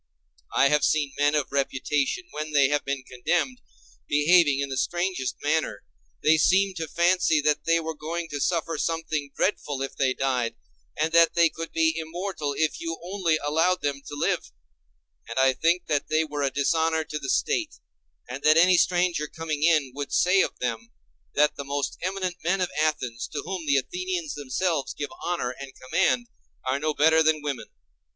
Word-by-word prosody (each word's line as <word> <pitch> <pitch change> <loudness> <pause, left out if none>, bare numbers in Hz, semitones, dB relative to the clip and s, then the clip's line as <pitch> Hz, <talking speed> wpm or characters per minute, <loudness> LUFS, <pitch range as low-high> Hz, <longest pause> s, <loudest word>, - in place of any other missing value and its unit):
I 140 - +5
have 150 0 +2
seen 145 -3 +1
men 145 +1 +2
of 145 -3 -1
reputation, 140 - -1
when 155 0 -5
they 140 -2 +5
have 145 0 0
been 140 -1 -3
condemned, 175 - -1 0.5
behaving 150 0 +4
in 140 0 -2
the 135 - -3
strangest 175 -4 -1
manner: 150 -9 0 0.4
they 160 +1 +5
seemed 190 +3 +3
to 160 -1 -3
fancy 170 -1 +2
that 150 0 +1
they 165 0 +3
were 160 0 -4
going 165 +3 -5
to 145 - -4
suffer 165 -1 0
something 160 -3 -2
dreadful 145 -8 -1
if 135 - -6
they 130 -2 +1
died, 125 -3 -1 0.4
and 160 +1 0
that 170 0 +5
they 170 -1 +5
could 165 +1 -7
be 160 0 +2
immortal 160 -2 -4
if 160 -1 0
you 165 -1 -3
only 180 -3 0
allowed 165 +5 +1
them 140 -1 -1
to 145 - -6
live; 145 - -1 0.8
and - - -6
I 130 0 +4
think 170 +6 +1
that 145 -2 -1
they 155 +1 +2
were 150 -2 -4
a 140 - +2
dishonor 160 +4 +1
to 150 -1 -5
the 135 -2 -6
State, - - 0 0.5
and 125 +3 -6
that 155 +2 +5
any 180 +2 +6
stranger 175 -4 +2
coming 155 -2 -4
in 155 -5 +3
would 145 +1 -5
say 185 +2 +4
of - - -2
them 115 -2 -3 0.5
that 150 +1 +3
the 140 - -4
most 140 0 -3
eminent 185 -1 -2
men 185 +4 +1
of 185 - -1
Athens, 125 -7 -1
to - - -3
whom 180 -5 -5
the 140 -1 +4
Athenians 360 - -3
themselves 145 +2 -2
give 145 - -5
honor 175 -8 -1
and 135 -1 -8
command, 130 -1 +1 0.4
are 130 +2 +1
no 155 0 -1
better 160 +2 +5
than 155 -1 +2
women. 140 -4 -4
155 Hz, 185 wpm, -25 LUFS, 140-170 Hz, 0.8 s, any